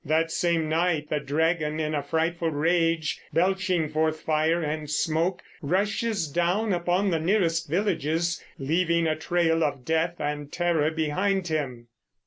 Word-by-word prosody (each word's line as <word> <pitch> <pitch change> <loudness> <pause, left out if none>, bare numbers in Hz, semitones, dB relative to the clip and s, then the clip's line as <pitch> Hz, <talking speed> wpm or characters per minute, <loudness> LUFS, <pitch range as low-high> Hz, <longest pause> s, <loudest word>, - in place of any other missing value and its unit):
That 160 +2 +1
same 170 -3 +1
night 160 -1 0
the 150 - +1
dragon, 155 +1 0
in 155 0 -1
a 145 - 0
frightful 165 +3 -1
rage, 165 +1 +1
belching 185 -2 +1
forth 155 +1 0
fire 160 +2 +1
and 150 0 -3
smoke, 165 +4 0 0.2
rushes 200 +3 0
down 175 +8 +1
upon 180 +3 +1
the 165 - +1
nearest 165 -3 +1
villages, 170 -2 0
leaving 170 +4 +1
a 155 -1 +1
trail 165 0 +1
of 140 -4 -2
death 160 +3 +1
and 145 -1 -4
terror 170 -3 +1
behind 175 +4 0
him. 130 -7 -3
165 Hz, 140 wpm, -26 LUFS, 155-175 Hz, 0.2 s, That